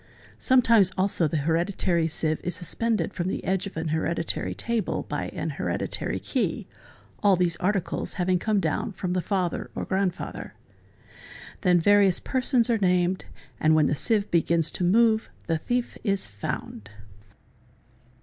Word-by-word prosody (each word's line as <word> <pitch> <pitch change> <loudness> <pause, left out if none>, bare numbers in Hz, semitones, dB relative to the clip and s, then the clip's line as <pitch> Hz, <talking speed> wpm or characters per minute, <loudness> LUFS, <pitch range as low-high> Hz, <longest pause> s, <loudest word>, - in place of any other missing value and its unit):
Sometimes 230 -7 +4
also 185 -3 +2
the 155 - -1
hereditary 170 0 +1
sieve 155 -1 0
is 180 - -2
suspended 195 +2 -1
from 175 0 -3
the - - -3
edge 190 +1 -1
of 195 - -9
an 160 0 -2
hereditary 160 +1 -2
table 235 -2 -2
by - - -3
an - - -4
hereditary - - -2
key— - - -2 0.6
all 200 -2 +5
these 175 -2 +1
articles 195 -1 -1
having 180 -1 +1
come 215 +1 +1
down 205 - -1
from 180 0 -3
the 180 - 0
father 185 -2 -2
or - - -3
grandfather. 190 -2 -3 0.5
— - - -17
Then 180 -2 +4
various 200 +1 +4
persons 255 -2 +1
are 230 -3 +1
named 180 -1 +1 0.3
and 155 0 +4
when 155 -1 +4
the - - +1
sieve 210 - 0
begins 170 -1 +2
to - - -3
move 220 +4 +3 0.2
the 165 -1 0
thief 245 +7 -2
is 200 -3 0
found. 100 0 -6
185 Hz, 150 wpm, -26 LUFS, 170-205 Hz, 0.6 s, all